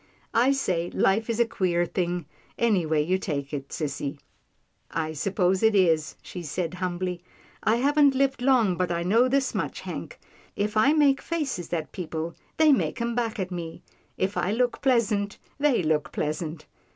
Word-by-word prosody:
I 245 Hz, +4 st, +4 dB
say 180 Hz, -11 st, 0 dB
life 215 Hz, +4 st, +1 dB
is 230 Hz, 0 st, -1 dB
a 235 Hz, -, +5 dB
queer 180 Hz, -6 st, 0 dB
thing, 175 Hz, -1 st, -2 dB, 0.3 s
anyway 170 Hz, -10 st, +2 dB
you 185 Hz, +3 st, +1 dB
take 140 Hz, -6 st, -4 dB
it, 140 Hz, -1 st, -4 dB
sissy." 145 Hz, -2 st, -3 dB, 0.4 s
" -, -, -36 dB
I 155 Hz, -, -5 dB
s'pose 185 Hz, +3 st, +1 dB
it 220 Hz, -1 st, +4 dB
is," 165 Hz, -5 st, +3 dB
she 180 Hz, -, -7 dB
said 170 Hz, +2 st, -3 dB
humbly, 180 Hz, -1 st, -3 dB, 0.2 s
" -, -, -28 dB
I -, -, +4 dB
haven't 285 Hz, +2 st, +4 dB
lived 270 Hz, -1 st, +1 dB
long, 245 Hz, -9 st, +3 dB
but 180 Hz, -1 st, 0 dB
I 170 Hz, 0 st, -1 dB
know 225 Hz, +8 st, +4 dB
this 270 Hz, +1 st, +1 dB
much, -, -, -3 dB
Hank. -, -, -7 dB, 0.4 s
If 210 Hz, +2 st, -1 dB
I 215 Hz, +7 st, +5 dB
make 290 Hz, -3 st, +4 dB
faces 285 Hz, -, -3 dB
at 160 Hz, -3 st, -2 dB
people, 165 Hz, -2 st, -4 dB, 0.2 s
they 315 Hz, -1 st, +6 dB
make 270 Hz, -, +1 dB
'em 235 Hz, 0 st, -1 dB
back 230 Hz, -1 st, -1 dB
at 185 Hz, -1 st, -3 dB
me; 170 Hz, -2 st, -6 dB, 0.3 s
if 190 Hz, +2 st, -1 dB
I 185 Hz, -, +1 dB
look 245 Hz, +2 st, 0 dB
pleasant, 220 Hz, -6 st, +1 dB, 0.2 s
they 280 Hz, -9 st, +3 dB
look 155 Hz, -1 st, 0 dB
pleasant." 155 Hz, +1 st, -3 dB
190 Hz, 175 wpm, -26 LUFS, 170-240 Hz, 0.4 s, they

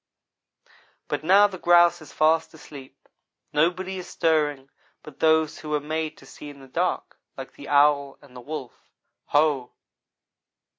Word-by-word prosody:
But -, -, -3 dB
now 195 Hz, +5 st, +6 dB
the 190 Hz, -3 st, -4 dB
grouse 175 Hz, -1 st, +4 dB
is 155 Hz, -, -13 dB
fast 160 Hz, +1 st, +1 dB
asleep; 140 Hz, -3 st, -14 dB, 0.5 s
nobody 185 Hz, +4 st, 0 dB
is 180 Hz, -, -9 dB
stirring 145 Hz, -4 st, 0 dB, 0.3 s
but 150 Hz, -3 st, -13 dB
those 160 Hz, -1 st, +2 dB
who 155 Hz, -, -9 dB
were 150 Hz, 0 st, 0 dB
made 155 Hz, +1 st, -4 dB
to -, -, -16 dB
see 150 Hz, -, -11 dB
in 145 Hz, -1 st, -13 dB
the 135 Hz, -, -14 dB
dark, 130 Hz, -, -3 dB, 0.2 s
like -, -, -9 dB
the -, -, -12 dB
owl 145 Hz, -1 st, +3 dB
and 140 Hz, -3 st, -19 dB
the 125 Hz, -, -9 dB
wolf. 135 Hz, -2 st, -9 dB, 0.4 s
Ho! 145 Hz, -4 st, +1 dB
155 Hz, 150 wpm, -24 LUFS, 145-165 Hz, 0.5 s, now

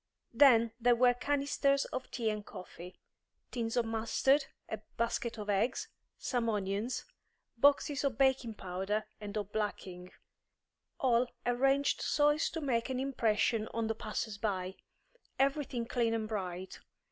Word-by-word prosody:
Then 235 Hz, -3 st, +6 dB
there 240 Hz, +1 st, +5 dB
were 245 Hz, +1 st, +5 dB
canisters 280 Hz, +1 st, +1 dB
of 260 Hz, -, -5 dB
tea 225 Hz, -3 st, -1 dB
and 210 Hz, -1 st, -4 dB
coffee, 180 Hz, -2 st, -10 dB, 0.6 s
tins 230 Hz, -1 st, -2 dB
of 240 Hz, -, +3 dB
mustard, 230 Hz, +5 st, +2 dB, 0.2 s
a -, -, -4 dB, 0.2 s
basket 235 Hz, 0 st, -1 dB
of 210 Hz, -1 st, -6 dB
eggs, 205 Hz, +5 st, 0 dB, 0.3 s
some 240 Hz, -3 st, -1 dB
onions, 205 Hz, +3 st, -2 dB, 0.5 s
boxes 285 Hz, +2 st, +3 dB
of 270 Hz, -5 st, 0 dB
baking 265 Hz, -4 st, +2 dB
powder 195 Hz, +3 st, -2 dB
and 210 Hz, 0 st, -5 dB
of 205 Hz, -1 st, -4 dB
blacking; 185 Hz, -4 st, -4 dB, 0.9 s
all 250 Hz, -4 st, +3 dB, 0.2 s
arranged 270 Hz, +3 st, +2 dB
so 295 Hz, 0 st, +3 dB
as 295 Hz, +2 st, +1 dB
to 325 Hz, -, -5 dB
make 245 Hz, -4 st, 0 dB
an 255 Hz, -1 st, -1 dB
impression 225 Hz, -4 st, +1 dB
on 230 Hz, -1 st, 0 dB
the 225 Hz, -, 0 dB
passers 215 Hz, -1 st, -4 dB
by; 190 Hz, -4 st, -2 dB, 0.6 s
everything 270 Hz, -3 st, 0 dB
clean 230 Hz, -1 st, +1 dB
and 220 Hz, -1 st, -2 dB
bright. 185 Hz, -3 st, -5 dB
230 Hz, 140 wpm, -33 LUFS, 210-265 Hz, 0.9 s, Then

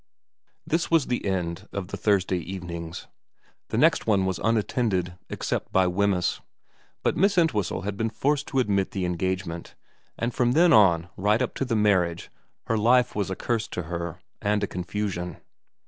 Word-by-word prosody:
This 165 Hz, +2 st, 0 dB
was 165 Hz, -5 st, +4 dB
the 125 Hz, -, -2 dB
end 90 Hz, -3 st, -2 dB
of 100 Hz, -3 st, -5 dB
the -, -, -4 dB
Thursday 95 Hz, -3 st, +1 dB
evenings. 85 Hz, -2 st, -6 dB, 0.6 s
The -, -, -3 dB
next -, -, +3 dB
one 100 Hz, -3 st, +3 dB
was 95 Hz, -1 st, -1 dB
unattended, 105 Hz, -5 st, +1 dB, 0.2 s
except -, -, -3 dB
by 95 Hz, -1 st, +4 dB
Wemyss; 90 Hz, 0 st, +1 dB, 0.6 s
but -, -, +1 dB
Miss 195 Hz, +3 st, +3 dB
Entwhistle 110 Hz, -, +1 dB
had 100 Hz, 0 st, -3 dB
been 115 Hz, +1 st, 0 dB
forced 145 Hz, +6 st, 0 dB
to 135 Hz, -, -3 dB
admit 100 Hz, -6 st, +2 dB
the 95 Hz, -2 st, -1 dB
engage 95 Hz, +2 st, -1 dB
ment, 85 Hz, 0 st, -7 dB, 0.4 s
and 115 Hz, +1 st, -2 dB
from 120 Hz, 0 st, +2 dB
then 170 Hz, +3 st, +5 dB
on 90 Hz, -5 st, +5 dB
right 105 Hz, +3 st, +2 dB
up 130 Hz, -, -1 dB
to 135 Hz, -, -2 dB
the 120 Hz, -3 st, -1 dB
marriage 95 Hz, -5 st, +1 dB, 0.3 s
her 115 Hz, -1 st, 0 dB
life 120 Hz, +3 st, +4 dB
was 100 Hz, -2 st, -1 dB
a 95 Hz, -, -2 dB
curse 115 Hz, +1 st, -1 dB
to 90 Hz, -, -4 dB
her 85 Hz, 0 st, -5 dB, 0.2 s
and 105 Hz, 0 st, +1 dB
a -, -, +1 dB
confusion. 90 Hz, 0 st, -4 dB
100 Hz, 175 wpm, -26 LUFS, 90-115 Hz, 0.6 s, then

